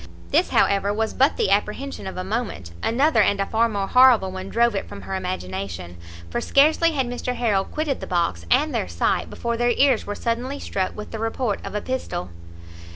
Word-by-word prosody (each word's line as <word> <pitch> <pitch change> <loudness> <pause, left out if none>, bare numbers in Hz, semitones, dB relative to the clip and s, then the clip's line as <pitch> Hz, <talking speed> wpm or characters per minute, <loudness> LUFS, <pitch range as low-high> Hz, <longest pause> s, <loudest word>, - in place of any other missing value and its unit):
This, - - +3
however, 200 0 +2
was 220 +1 -1
but 270 +2 +3
the 195 - +1
apprehension 210 +5 -1
of 190 - -6
a 185 - -3
moment; 200 - -4
another 250 +1 +3
and 200 0 +2
a 195 - +1
far 230 +3 +1
more 200 -3 -2
horrible 250 -4 +5
one 190 +1 -6
drove 235 0 +2
it 195 - -4
from 200 - -9
her - - -6
imagination; 95 - -4 0.4
for - - -1
scarcely 315 +4 +4
had 270 -3 0
Mr 245 +1 -3
Harrel 210 -6 +1
quitted 305 -3 -2
the - - -7
box 170 - 0
and - - +3
their - - -1
sight, 85 -1 0
before 235 0 -3
their 240 +1 +2
ears 265 -1 +3
were 205 - -3
suddenly 245 +6 -2
struck 190 -8 -3
with 210 - -7
the 225 - -5
report 225 -1 -2
of - - -6
a 210 - -1
pistol. 255 - -4
215 Hz, 205 wpm, -23 LUFS, 190-250 Hz, 0.4 s, horrible